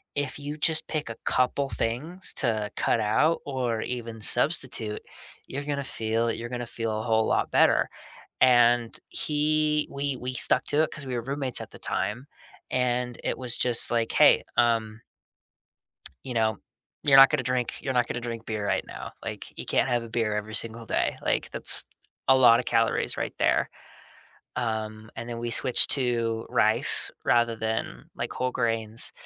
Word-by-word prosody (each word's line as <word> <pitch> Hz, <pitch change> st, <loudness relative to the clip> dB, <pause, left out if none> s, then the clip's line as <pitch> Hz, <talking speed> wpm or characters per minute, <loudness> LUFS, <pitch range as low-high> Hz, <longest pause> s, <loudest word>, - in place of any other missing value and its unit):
if 145 Hz, -1 st, -1 dB
you 145 Hz, +1 st, -6 dB
just 155 Hz, +1 st, 0 dB
pick 150 Hz, -6 st, -3 dB
a 115 Hz, -, -7 dB
couple 135 Hz, +2 st, +1 dB
things 155 Hz, +14 st, -3 dB
to 110 Hz, -5 st, -1 dB
cut 115 Hz, -, +1 dB
out 150 Hz, +10 st, +2 dB
or 125 Hz, -5 st, -2 dB
even 115 Hz, -3 st, -5 dB
substitute, 120 Hz, -4 st, 0 dB, 0.5 s
you're 140 Hz, +2 st, -5 dB
gonna 140 Hz, -1 st, -2 dB
feel 115 Hz, 0 st, -1 dB
you're 120 Hz, +1 st, -5 dB
gonna 120 Hz, -1 st, -4 dB
feel 115 Hz, -2 st, -3 dB
a -, -, -4 dB
whole 110 Hz, -1 st, +2 dB
lot -, -, +1 dB
better," -, -, +4 dB, 0.5 s
and 120 Hz, -2 st, +4 dB
he 150 Hz, 0 st, 0 dB
we 140 Hz, -1 st, -3 dB
we 125 Hz, +1 st, -5 dB
stuck 125 Hz, +1 st, +3 dB
to 150 Hz, +2 st, +1 dB
it -, -, -2 dB
'cause 145 Hz, -3 st, -9 dB
we 125 Hz, -, -3 dB
were 120 Hz, -, -2 dB
roommates 135 Hz, -1 st, -3 dB
at -, -, -9 dB
the -, -, -13 dB
time, 105 Hz, -, -3 dB, 0.4 s
and 125 Hz, -1 st, -1 dB
it -, -, -2 dB
was 125 Hz, -2 st, -1 dB
just 120 Hz, -2 st, +4 dB
like, 115 Hz, -1 st, 0 dB
"Hey, -, -, +6 dB
um" 115 Hz, -2 st, +1 dB, 1.2 s
"you 125 Hz, -, -5 dB
know, 110 Hz, -2 st, +1 dB, 0.5 s
you're 135 Hz, -2 st, +6 dB
not 135 Hz, 0 st, +10 dB
gonna 130 Hz, -, 0 dB
drink 125 Hz, -1 st, -1 dB
you're 135 Hz, -, -2 dB
not 120 Hz, -1 st, +2 dB
gonna 120 Hz, -, -3 dB
drink 115 Hz, -1 st, -6 dB
beer 110 Hz, -2 st, -3 dB
right -, -, 0 dB
now, -, -, -8 dB
like, -, -, -6 dB
you -, -, -5 dB
can't -, -, +1 dB
have 120 Hz, -1 st, 0 dB
a 115 Hz, -, -9 dB
beer 110 Hz, -2 st, -1 dB
every 105 Hz, +1 st, -4 dB
single 115 Hz, 0 st, -2 dB
day, -, -, -1 dB
like, -, -, 0 dB
that's -, -, +5 dB, 0.4 s
a 130 Hz, 0 st, +6 dB
lotta 120 Hz, -1 st, +6 dB
calories 115 Hz, -1 st, 0 dB
right -, -, -3 dB
there." -, -, +2 dB, 0.9 s
Um, 110 Hz, -2 st, -3 dB
and 115 Hz, +1 st, -6 dB
then 120 Hz, -1 st, -5 dB
we 120 Hz, 0 st, -3 dB
switched 125 Hz, +1 st, +2 dB
to 115 Hz, -4 st, -1 dB
rice -, -, +4 dB
rather 120 Hz, -1 st, +2 dB
than, 110 Hz, 0 st, -3 dB
like, -, -, -4 dB
whole 130 Hz, 0 st, -1 dB
grains, 115 Hz, -2 st, -2 dB
120 Hz, 175 wpm, -26 LUFS, 115-130 Hz, 1.2 s, not